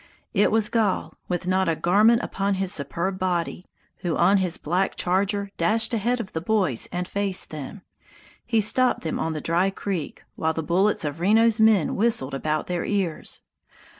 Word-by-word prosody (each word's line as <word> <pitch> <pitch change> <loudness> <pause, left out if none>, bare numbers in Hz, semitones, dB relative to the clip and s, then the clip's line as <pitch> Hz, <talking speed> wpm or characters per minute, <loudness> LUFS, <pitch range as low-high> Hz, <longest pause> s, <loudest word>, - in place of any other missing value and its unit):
It 205 - +3
was 220 -1 +2
Gall, 215 -5 0
with 180 -1 -3
not 185 -1 +1
a 165 - +1
garment 215 +8 +3
upon 195 0 -1
his 190 -1 -1
superb 170 +7 -2
body, 180 0 -2 0.3
who 175 -3 -2
on 190 +4 +4
his 180 -3 0
black 180 +5 -1
charger 200 +2 0
dashed 225 +2 +2
ahead 235 +3 0
of 215 -5 -6
the 160 - -3
boys 180 - 0
and 180 0 -3
faced 200 -2 0
them. 155 +6 -8 0.6
He 225 -2 +1
stopped 250 +4 +3
them 160 - -3
on 160 - -2
the 155 - -4
dry 175 +3 +1
creek, 195 -4 -5
while 160 0 -1
the 160 - -3
bullets 185 +3 +1
of 145 +2 -4
Reno's 220 +4 +3
men 220 -6 +4
whistled 200 - +1
about 155 +2 -2
their 175 -1 -2
ears. 195 -6 -2
190 Hz, 175 wpm, -24 LUFS, 170-210 Hz, 0.6 s, on